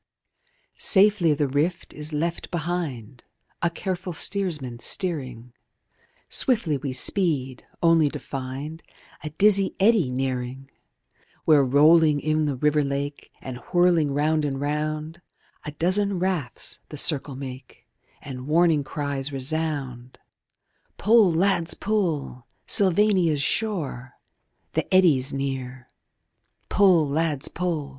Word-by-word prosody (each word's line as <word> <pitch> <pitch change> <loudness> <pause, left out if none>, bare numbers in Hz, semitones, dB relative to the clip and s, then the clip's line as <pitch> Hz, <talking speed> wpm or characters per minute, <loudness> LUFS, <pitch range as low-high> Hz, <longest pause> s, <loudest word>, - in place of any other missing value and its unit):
II 485 +1 -44
Safely 195 -5 +5
the 145 -1 0
Rift 150 +6 -2
is 150 +1 -8
left 165 +3 -3
behind, 155 -9 -4 0.4
A 170 - +2
careful 180 +1 -5
stearsman 155 -11 -3
stearing; 130 - -4 0.7
Swiftly 215 - +1
we 140 -2 -4
speed, 135 -2 0 0.2
only 165 -3 +4
to 150 - -6
find 140 +4 -7 0.4
A 155 - -4
dizzy 195 +4 +4
eddy 200 - +3
nearing, 130 +1 -4 0.7
Where 150 -3 +5
rolling 150 +3 +4
in 155 +1 0
the 145 -2 -1
river 150 +3 +1
lake, 140 +1 -4
And 130 -2 -6
whirling 175 -3 +3
round 155 +2 +1
and 135 -2 -2
round 155 +3 -3 0.4
A 150 - -5
dozen 190 +5 0
rafts 175 -8 -2
the 150 - -8
circle 140 -2 +2
make, 130 -1 -10 0.4
And 130 -1 -8
warning 160 -1 +3
cries 140 0 -4
resound: 135 -3 -4 0.8
Pull, 215 -4 +4
lads, 170 0 +1
pull! 165 - -2 0.2
Sylvania's 185 -6 +3
shore! 150 - -3 0.6
The - - -2
Eddy's 150 -8 +4
near! 130 -2 -5 0.8
Pull, 180 -6 +4
lads, 150 -1 -1
pull! 165 -5 -3
150 Hz, 115 wpm, -24 LUFS, 135-175 Hz, 0.8 s, Safely